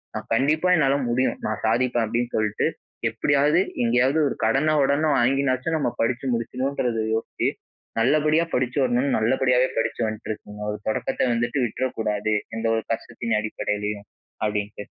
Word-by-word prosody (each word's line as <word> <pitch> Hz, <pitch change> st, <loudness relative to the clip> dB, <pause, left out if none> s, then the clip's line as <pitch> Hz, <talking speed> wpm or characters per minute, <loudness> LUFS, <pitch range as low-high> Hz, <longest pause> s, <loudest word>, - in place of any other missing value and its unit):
நான், -, -, -5 dB
"கண்டிப்பா 155 Hz, +8 st, +2 dB
என்னால 140 Hz, -4 st, +3 dB
முடியும். 130 Hz, +2 st, +1 dB
நான் -, -, -2 dB
சாதிப்பேன்" 120 Hz, +1 st, +2 dB
அப்பிடின்னு 120 Hz, +2 st, -2 dB
சொல்லிட்டு, 110 Hz, -1 st, +1 dB, 0.4 s
எப்படியாவது, 145 Hz, +4 st, +3 dB, 0.2 s
எங்கேயாவது 125 Hz, +6 st, +3 dB
ஒரு -, -, -4 dB
கடன, 145 Hz, +7 st, +2 dB
உடன 150 Hz, +3 st, +2 dB
வாங்கினாச்சும், 135 Hz, +4 st, +1 dB
நம்ம 140 Hz, -, 0 dB
படிச்சு 120 Hz, +3 st, 0 dB
முடிச்சுடணுன்றத 125 Hz, 0 st, -1 dB, 0.2 s
யோசிச்சு, 115 Hz, -, -1 dB, 0.5 s
நல்லபடியா 155 Hz, +5 st, +3 dB
படிச்சு 125 Hz, +2 st, 0 dB
வரணும்னு, 125 Hz, +2 st, +1 dB
நல்லபடியாவே 125 Hz, +2 st, +2 dB
படிச்சு 115 Hz, -, -1 dB
வந்துட்டு 110 Hz, 0 st, -5 dB
இருக்கேங்க." 105 Hz, 0 st, -8 dB
ஒரு 105 Hz, -, -5 dB
தொடக்கத்த 130 Hz, +2 st, 0 dB
வந்துட்டு 120 Hz, +4 st, 0 dB
விட்றக்கூடாது. 110 Hz, -3 st, -2 dB, 0.2 s
எந்த 115 Hz, 0 st, -1 dB
ஒரு 110 Hz, -, -1 dB
கஷ்டத்தின் 115 Hz, -1 st, -2 dB
அடிப்படையிலயும்", 105 Hz, -1 st, -3 dB, 0.4 s
அப்படின்ட்டு. 105 Hz, -1 st, -2 dB
120 Hz, 135 wpm, -24 LUFS, 110-135 Hz, 0.5 s, என்னால